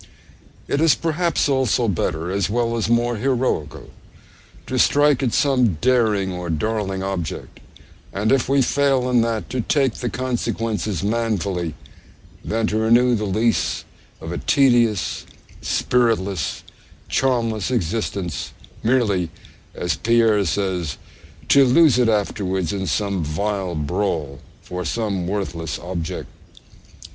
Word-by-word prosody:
It 140 - 0
is, 160 -5 +5
perhaps, 165 +6 0
also 130 -4 +1
better, 85 -3 -1
as 100 -1 0
well 115 +1 0
as 115 -1 -1
more 120 0 +2
heroical, 120 - -1 0.7
to - - -2
strike 145 -1 +4
at 130 -3 +1
some 125 - +2
daring 110 -6 +2
or 90 -1 -5
darling 95 +3 -2
object, 95 -5 -5 0.5
and 105 +3 0
if 135 -2 +2
we 135 -1 +4
fail 135 -2 +2
in 120 -2 +4
that, 115 -1 -1
to 130 - -1
take 135 0 +1
the 120 - -4
consequences 115 -6 -2
manfully, 100 -7 -1 0.7
than 115 0 -1
to 110 0 0
renew 120 +3 +4
the 105 -2 0
lease 110 +4 0 0.4
of 80 - -7
a 85 - -3
tedious, 120 - +2 0.3
spiritless, 105 -8 0 0.4
charmless 115 -5 0
existence, 100 - -2 0.3
merely 110 -8 +1 0.5
(as 90 - -1
Pierre 115 -3 +3
says) 90 -3 -1 0.5
'to 140 - +6
lose 135 0 +5
it 120 -2 +3
afterwards 95 -4 -1
in 95 -2 -3
some 100 +1 -1
vile 95 +3 -2
brawl' 75 -3 -2 0.2
for 90 0 -5
some 100 -1 -2
worthless 90 -5 -3
object. 85 -2 -5
110 Hz, 125 wpm, -21 LUFS, 95-125 Hz, 0.7 s, to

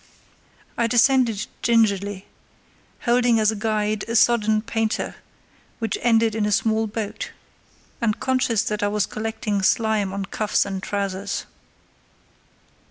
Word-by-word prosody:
I 235 - +3
descended 240 -2 +3 0.2
gingerly, 205 -4 +1 0.8
holding 240 -1 +3
as 215 0 +3
a - - -4
guide 215 -1 -1
a 230 - -3
sodden 220 -2 +3
painter 225 -1 -2 0.6
which 225 -3 -2
ended 225 -2 +3
in 215 -1 0
a - - -1
small 220 +1 +1
boat, 220 - -5 0.7
and 220 -2 0
conscious 255 -5 +1
that 210 0 -2
I 205 - +2
was 210 -1 0
collecting 215 -2 -3
slime 215 -1 +1
on 195 0 -3
cuffs 210 +2 0
and 195 -1 -4
trousers. 200 0 -3
220 Hz, 125 wpm, -23 LUFS, 205-230 Hz, 0.8 s, I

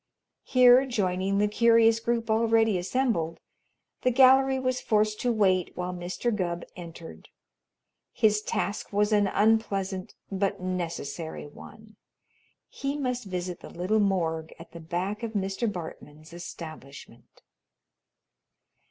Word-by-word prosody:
Here, 250 0 +6
joining 195 -4 0
the 210 +1 +3
curious 230 +1 +4
group 230 -1 -1
already 225 -1 +3
assembled, 180 -5 -1 0.6
the 255 - +3
gallery 265 +1 +5
was 255 -1 -1
forced 215 0 +1
to 245 - +1
wait 190 -5 +1
while 180 0 -3
Mr. 180 +6 -2
Gubb 175 -3 -3
entered. 170 -2 -11 0.8
His 210 -2 +2
task 205 -1 -3
was 210 +1 +1
an 205 -1 +3
unpleasant 195 -3 0 0.2
but 195 0 -1
necessary 170 -4 -4
one. 215 +8 -14 0.7
He 280 +1 -4
must 250 -4 -2
visit 180 -2 -4
the - - -11
little 185 +5 0
"morgue" 165 -5 -1
at 165 - -13
the 170 - -10
back 180 +6 -3
of 230 -1 -4
Mr. 200 +2 -1
Bartman's 160 -3 -9
establishment. 155 -8 -11
200 Hz, 120 wpm, -27 LUFS, 175-230 Hz, 0.8 s, Here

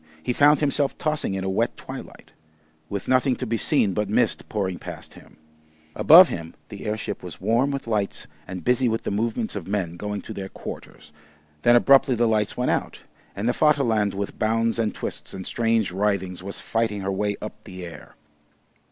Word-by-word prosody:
He 125 - 0
found 145 +3 +5
himself 145 -1 +1
tossing 155 -10 -1
in 95 - -3
a - - -2
wet - - 0
twilight, - - -10 0.6
with 100 -1 -4
nothing 130 0 +3
to 130 - -4
be 115 0 -1
seen 100 -2 +2
but 105 +1 -1
mist 110 +1 +1
pouring 95 -4 -2
past - - -9
him. - - -17 0.6
Above 175 +5 +9
him 85 -1 -6
the - - -7
airship 105 0 -3
was 90 -3 -9
warm 115 +7 +2
with 140 -1 -3
lights 105 -4 -2 0.2
and 90 -2 -6
busy 125 +3 +2
with 115 0 -2
the - - -2
movements 110 +2 -1
of 95 -4 -5
men 95 -4 -2
going 105 +1 -4
to 110 - -7
their 95 -2 -6
quarters. - - -9 0.5
Then 120 - +5
abruptly 135 +1 +5
the 120 0 +2
lights 105 -2 0
went 125 - +1
out, - - -2 0.3
and 100 +3 -2
the 120 - +3
Vaterland 120 -11 +2
with 100 0 -4
bounds 115 +1 +1
and 110 -2 +1
twists - - -6
and 95 -1 -6
strange 115 -4 +1
writhings 95 -2 -1
was 100 +1 -7
fighting 110 -3 -1
her 95 +1 -2
way 100 +1 -1
up 105 - -8
the 90 -3 -8
air. 85 - -11
110 Hz, 190 wpm, -24 LUFS, 100-120 Hz, 0.6 s, Above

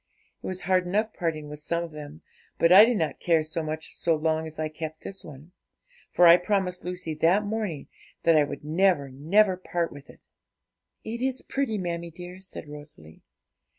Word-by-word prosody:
It - - -7
was 185 0 -4
hard 185 -1 +2
enough 215 +4 0
parting 155 -3 -3
with 150 0 -8
some 170 +3 -1
of 170 - -8
them; 150 0 -10 0.3
but 165 - +3
I 200 +4 +10
did 240 -1 +1
not 160 -4 -2
care 165 -2 +2
so 155 +1 -2
much 155 0 -5
so 165 -1 +1
long 160 +1 -1
as 155 - -10
I 155 0 -1
kept 155 0 -7
this 195 - -7
one, 150 +2 -12 0.6
for 175 - +4
I 170 +1 +9
promised 180 -1 -1
Lucy 180 -2 -4
that 170 +7 +2
morning 205 -8 -3 0.4
that 165 - +5
I 150 - +5
would 145 - -6
never, 160 -3 +2
never 185 +9 +3
part 175 -2 -2
with 145 0 -13
it.' - - -18 0.8
'It 230 +2 -5
is 260 0 -1
pretty, 270 -6 -2
mammie 170 -2 -4
dear,' 180 +2 -10
said 185 -4 -9
Rosalie. 145 - -12
170 Hz, 190 wpm, -26 LUFS, 155-185 Hz, 0.8 s, I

